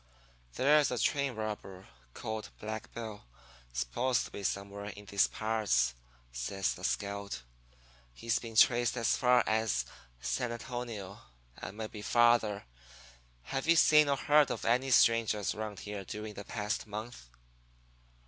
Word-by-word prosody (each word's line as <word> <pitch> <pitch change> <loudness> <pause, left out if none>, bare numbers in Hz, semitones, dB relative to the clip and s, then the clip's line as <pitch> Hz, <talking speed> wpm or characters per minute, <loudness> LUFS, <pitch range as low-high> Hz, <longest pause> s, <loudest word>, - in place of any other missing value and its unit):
"'There's 150 +2 +4
a 125 - -2
train 140 0 +1
robber 105 -3 -6 0.3
called 110 0 -5
Black 110 0 -6
Bill 110 -3 -7 0.5
supposed 60 - 0
to - - -11
be - - -7
somewhere 100 +1 -3
in 105 0 -8
these 100 0 +3
parts,' 105 - +1 0.4
says 75 +11 -2
the - - -12
scout. 100 -8 -3 0.7
'He's 115 - -1
been 115 -2 -9
traced 120 +2 +4
as 115 - +2
far 125 -1 +4
as 110 - +1 0.3
San 120 - -2
Antonio, 115 -4 -6 0.4
and 105 - -8
maybe 110 -1 -6
farther. 115 -2 +3 0.8
Have 135 - -3
you 170 - +6
seen 150 -2 +6
or 140 - +2
heard 150 +1 +4
of - - -4
any 125 +3 +2
strangers 115 -4 +3
around 105 -2 -6
here 105 -1 -6
during 105 +3 -6
the 100 -1 -8
past 105 0 -3
month?' 105 - -7
110 Hz, 140 wpm, -32 LUFS, 100-120 Hz, 0.8 s, you